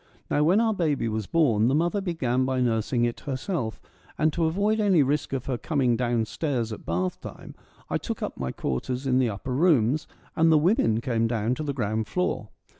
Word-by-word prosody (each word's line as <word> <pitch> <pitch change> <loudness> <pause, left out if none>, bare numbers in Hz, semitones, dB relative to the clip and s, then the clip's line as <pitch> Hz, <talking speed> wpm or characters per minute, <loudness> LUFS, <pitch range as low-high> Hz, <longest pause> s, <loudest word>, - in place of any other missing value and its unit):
Now 145 - +3
when 180 +7 +4
our 225 -1 +2
baby 150 - 0
was 110 -2 -3
born, 120 -10 +3
the 135 - +2
mother 175 +6 +1
began 130 -9 0
by 130 0 0
nursing 120 0 +1
it 120 - -3
herself, 135 - -3 0.4
and 155 0 +2
to 165 -1 +1
avoid 200 +7 +1
any 195 -8 +4
risk 145 +3 -1
of 135 -3 -3
her 125 -3 -2
coming 135 -6 +1
down 120 -2 0
stairs 120 -2 -2
at - - -10
bath 90 +2 -2
time, - - -9 0.3
I - - -1
took - - -5
up - - -4
my 65 -1 -3
quarters 125 - -3
in 130 -1 +2
the 125 -3 +2
upper 110 +5 -5
rooms, 145 -2 +2 0.3
and 165 0 +4
the 155 - +6
women 150 - +2
came 115 -2 0
down 115 0 0
to 155 - -4
the 145 - -2
ground 110 -2 -1
floor. 180 - -2
130 Hz, 205 wpm, -26 LUFS, 115-160 Hz, 0.4 s, the